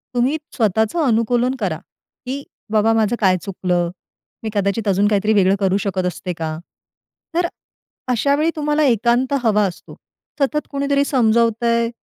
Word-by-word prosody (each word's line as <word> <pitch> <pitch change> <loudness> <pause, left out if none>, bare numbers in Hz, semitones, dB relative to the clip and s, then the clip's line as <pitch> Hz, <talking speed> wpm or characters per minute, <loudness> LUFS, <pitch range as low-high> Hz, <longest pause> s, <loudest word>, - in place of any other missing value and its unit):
तुम्ही 255 +6 +2 0.2
स्वतःचं 220 - +1
अनुकूलन 245 +1 +1
करा, 180 -7 -1 0.5
की 270 +3 -4 0.3
बाबा 220 +1 +3
माझं 225 0 +2
काय 185 -3 +3
चुकलं, 180 -3 -1 0.5
मी 220 - -2
कदाचित 200 +1 -1
अजून 200 +1 +3
काहीतरी 210 +1 +2
वेगळं 195 -1 +4
करू 195 -1 +2
शकत 190 -2 -2
असते 180 +1 -4
का? 155 -1 -3 0.8
तर 345 0 +2 0.6
अशा 280 +4 +2
वेळी 310 +3 +1
तुम्हाला 300 0 +1
एकांत 240 +2 +2
हवा 210 -2 +3
असतो. 175 - -10 0.4
सतत 290 +2 0
कोणीतरी 280 0 +1
समजवतंय 235 -2 +2
225 Hz, 140 wpm, -20 LUFS, 200-260 Hz, 0.8 s, वेगळं